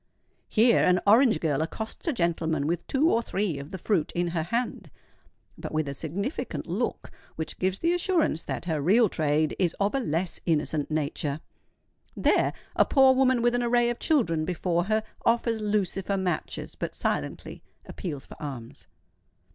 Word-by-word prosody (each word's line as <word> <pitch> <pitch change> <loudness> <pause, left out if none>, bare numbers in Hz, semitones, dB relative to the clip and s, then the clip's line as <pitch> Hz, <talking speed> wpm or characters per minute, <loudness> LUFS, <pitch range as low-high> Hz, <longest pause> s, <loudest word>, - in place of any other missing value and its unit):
Here 230 +2 +4
an 180 0 +4
orange 220 - +5
girl 155 -3 0
accosts 220 - -5
a - - +3
gentleman 165 - 0
with 170 +2 -2
two 300 +5 +3
or 230 - +3
three 195 -9 -2
of 140 +1 -8
the 190 - -6
fruit 185 -3 0
in 175 0 0
her 170 -1 -1
hand, 230 +9 -3 0.7
but - - -6
with 155 -1 -1
a 140 - -3
significant 175 - -4
look - - -3 0.2
which 160 - -5
gives 185 0 0
the 335 +8 +1
assurance 345 - +1
that - - -4
her 160 -4 -1
real 210 +8 +4
trade 155 -1 +1
is 180 -3 +1
of 200 +1 +1
a 275 - +1
less 175 - -2
innocent 155 -2 0
nature:—there 150 -1 -2 0.2
a - - +6
poor 265 -2 +5
woman 260 -2 +3
with 240 0 +3
an 245 - +1
array 240 0 +2
of 240 - -6
children 210 - +1
before 175 0 0
her, 215 +1 +1 0.2
offers 230 -1 +1
lucifer 200 -2 0
matches, 185 -2 -3
but - - -5
silently - - -3 0.2
appeals 150 -8 -6
for - - -13
alms. 130 -6 -7
185 Hz, 165 wpm, -27 LUFS, 160-235 Hz, 0.7 s, a